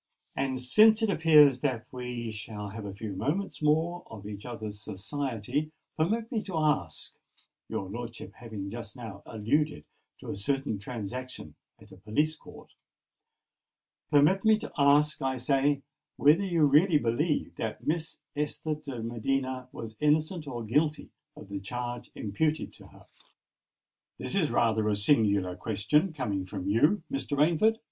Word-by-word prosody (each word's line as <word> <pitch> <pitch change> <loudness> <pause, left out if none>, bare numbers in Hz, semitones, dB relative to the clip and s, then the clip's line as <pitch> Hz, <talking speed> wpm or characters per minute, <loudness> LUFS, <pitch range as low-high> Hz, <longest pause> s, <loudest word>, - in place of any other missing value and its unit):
And 130 -1 -1
since 215 - +5
it 215 - +3
appears 150 -6 +6
that 125 -5 -1
we 125 -2 -4
shall 105 -1 -6
have 110 +1 -7
a 100 - -5
few 105 0 -5
moments 165 - -2
more 160 +4 +2
of 100 -2 -10
each 105 +2 -7
other's 110 -3 -6
society, 125 +7 -3 0.2
permit 220 +9 0
me 225 -4 0
to 185 -5 -5
ask,—your 110 - -3
lordship 115 +3 -7
having 105 -5 -7
just 115 -1 -7
now 110 -5 -8
alluded 145 +8 0 0.3
to - - -6
a - - -4
certain 125 +1 -1
transaction 115 - -6 0.3
at - - -17
a - - -12
police 150 +10 0
court,—permit 150 +2 -4
me 220 -1 +5
to 225 - -7
ask, 145 +1 +4
I 135 0 0
say, 140 +2 +1 0.3
whether 155 +7 +5
you 170 -4 +3
really 150 +4 +5
believe 145 +5 0
that 110 -1 -4
Miss 165 +1 -1 0.2
Esther 150 +1 -1
de 140 -6 -6
Medina 130 +2 -2
was 110 -1 -8
innocent 155 +2 +1
or 120 -4 -4
guilty 150 +7 0 0.2
of - - -11
the 100 0 -4
charge 120 +4 -5
imputed 150 +10 -1
to - - -13
her?" - - -18 1.1
"This - - -3
is - - +2
rather 110 -2 +2
a 105 - +2
singular 100 -5 +3
question—coming 110 - 0
from 95 -1 -5
you, 150 - +3
Mr. 215 - -2
Rainford!" 170 +9 +4
130 Hz, 145 wpm, -29 LUFS, 110-155 Hz, 1.1 s, appears